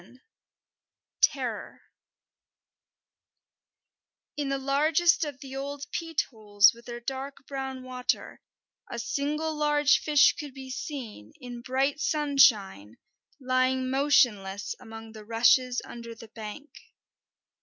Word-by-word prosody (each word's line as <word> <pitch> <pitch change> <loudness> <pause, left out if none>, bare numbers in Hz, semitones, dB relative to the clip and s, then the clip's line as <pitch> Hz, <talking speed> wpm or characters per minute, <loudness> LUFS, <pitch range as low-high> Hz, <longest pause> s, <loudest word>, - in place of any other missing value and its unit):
XI: 230 +8 -19 1.0
TERROR 265 -9 0 2.5
In 290 -1 -2
the 275 - 0
largest 305 +6 +3
of 290 -3 -5
the 270 -1 -8
old 280 +1 -5
peat 330 -2 -1
holes 210 -2 +4
with 235 +1 -17
their 240 0 -6
dark 270 +2 -6
brown 265 -2 -5
water, 255 -1 -3 0.5
a - - -5
single 300 +6 -2
large 295 -1 +3
fish 295 -2 +5
could 290 -4 -8
be 265 -1 -8
seen, 240 - -7
in 245 -1 -8
bright 270 +4 0
sunshine, 260 - +2 0.4
lying 255 0 +1
motionless 210 -8 +2
among 225 0 -10
the 215 -1 -11
rushes 245 +3 +3
under 235 -1 -9
the 225 0 -13
bank. 225 +7 -9
260 Hz, 110 wpm, -28 LUFS, 230-285 Hz, 2.5 s, fish